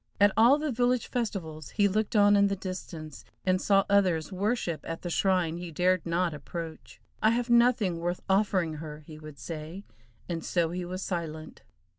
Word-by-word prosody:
At 205 0 +6
all 240 +6 +6
the 300 -1 -2
village 245 0 +1
festivals 175 - -4
he 205 -2 +2
looked 215 +3 -1
on 205 0 +6
in 200 0 +5
the 200 - -1
distance, 175 -5 -7 0.2
and 185 0 +2
saw 195 -1 +3
others 185 -6 +2
worship 190 -3 -1
at 165 - -6
the 175 - -3
shrine 180 -3 +1
he 175 0 -6
dared 180 +2 +1
not 170 0 0
approach. 160 +2 -8 0.2
"I 215 - +5
have 240 +1 0
nothing 235 -7 +3
worth 175 +1 -3
offering 190 -5 +1
her," 150 -1 -8
he 155 -1 -11
would 155 -2 -11
say, 160 +7 -7 0.4
and 165 -2 -3
so 170 -2 0
he 180 0 -4
was 185 +2 -5
silent. 160 -3 -5
185 Hz, 180 wpm, -28 LUFS, 165-205 Hz, 0.4 s, At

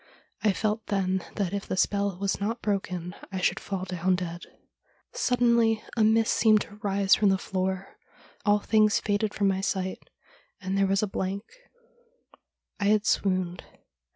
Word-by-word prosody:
I 215 - +4
felt 215 +2 -2
then 190 -2 0
that 195 -3 -1
if 200 0 -3
the 185 - -3
spell 200 -1 +1
was 200 +1 -2
not 225 +4 -2
broken 180 -4 -2 0.2
I 190 - -3
should 185 - +1
fall 195 -2 -4
down 185 0 0
dead. 175 -1 -5 0.7
Suddenly 235 -3 +2
a 225 - +3
mist 220 +1 +3
seemed 215 -2 +4
to 205 - -8
rise 200 -1 +2
from 210 -2 +4
the 190 - +3
floor; 190 0 -3 0.4
all 205 0 +4
things 215 +1 +3
faded 205 0 -1
from 200 0 +2
my 190 0 +1
sight, 190 -1 -2 0.6
and 190 -1 -3
there 195 0 +3
was 195 +2 +1
a - - +1
blank 195 +1 -3 0.7
— - - -34
I - - +1
had 210 +1 +3
swooned. 185 -4 0
200 Hz, 165 wpm, -27 LUFS, 190-215 Hz, 0.7 s, I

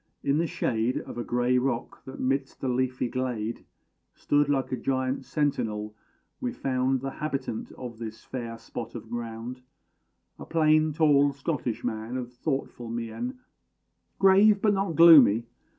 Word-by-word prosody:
In 140 +2 +2
the 170 - +1
shade 120 -3 -1
Of - - -8
a - - -2
grey 125 +1 +1
rock, 125 -2 -3
that 130 - -9
'midst 135 +1 -1
the 135 - -3
leafy 125 0 0
glade 120 -3 -3 0.5
Stood 145 0 +1
like 135 -3 0
a - - +1
giant 130 +1 -1
sentinel, 115 -7 -1 0.5
we 250 -1 -2
found 130 - 0
The 135 0 -3
habitant 135 -7 -4
of 120 -3 -8
this 110 -1 -7
fair 115 -3 -6
spot 115 +1 -7
of 115 -1 -8
ground 120 +1 -5 0.8
A - - -8
plain 155 -1 +3
tall 145 -2 +4
Scottish 135 -5 -3
man, 110 +3 -3
of 125 -1 -6
thoughtful 125 -3 -3
mien; 120 - -4 0.8
Grave 200 +2 +6
but 210 0 +3
not 195 -4 -1
gloomy. 140 -9 +8
130 Hz, 150 wpm, -27 LUFS, 120-145 Hz, 0.8 s, gloomy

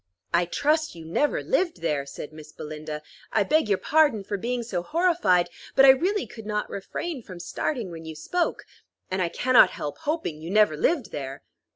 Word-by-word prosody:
"I 175 +1 +4
trust 305 - +1
you 165 -1 -10
never 285 - 0
lived 370 -8 0
there," 145 -4 -1
said 145 +2 -8
Miss 155 -1 -11
Belinda. 150 0 -7 0.3
"I 215 - +3
beg 305 +3 +2
your 200 - +3
pardon 290 -8 +3
for 205 - -3
being 240 +4 -2
so 195 -6 -2
horrified, 300 - +2 0.3
but 270 - +8
I - - +9
really 365 +10 +4
could 220 -2 -11
not 210 -1 -1
refrain 265 - -4
from 185 -5 -10
starting 215 - -3
when 165 -1 -8
you 160 0 -7
spoke; 340 - -1 0.5
and 185 0 0
I 175 - +1
cannot 255 +6 +5
help 145 - -6
hoping 290 - -2
you 165 - -6
never 210 -5 +4
lived 275 - +1
there." 135 -1 -6
205 Hz, 190 wpm, -26 LUFS, -, 0.5 s, I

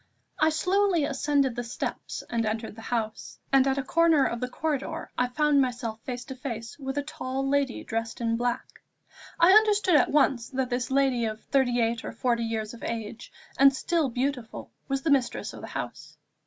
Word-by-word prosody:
I 310 - +5
SLOWLY 365 +1 +2
ascended 280 -2 +1
the 245 - -3
steps 235 - -5
and 230 -1 -1
entered 220 0 -3
the 225 - -10
house, 225 -2 -3 0.2
and 270 0 +5
at 270 0 +1
a 275 - 0
corner 325 0 +4
of 235 - -2
the 250 - -2
corridor 315 +3 -3
I 250 - +1
found 290 +2 +3
myself 240 -3 -2
face 245 0 -5
to 265 - -7
face 230 -1 -6
with 270 0 -4
a 285 - 0
tall 270 -2 -3
lady 275 -2 0
dressed 225 0 -3
in 230 -1 0
black. 240 +1 -3 0.6
I 340 +2 +7
understood 420 -2 +5
at 265 - +3
once 270 -5 +2
that 260 -1 -2
this 245 0 -1
lady 265 -3 +2
of 215 0 -4
thirty 255 -3 +2
eight 230 0 0
or - - -6
forty 240 -2 0
years 220 -1 -3
of 235 - -11
age, 230 0 -5 0.3
and 275 0 +7
still 320 0 0
beautiful, 250 -1 -3 0.2
was 270 -1 -2
the 320 - +1
mistress 270 -3 +1
of - - -9
the - - -7
house. - - -7
260 Hz, 195 wpm, -27 LUFS, 235-285 Hz, 0.6 s, I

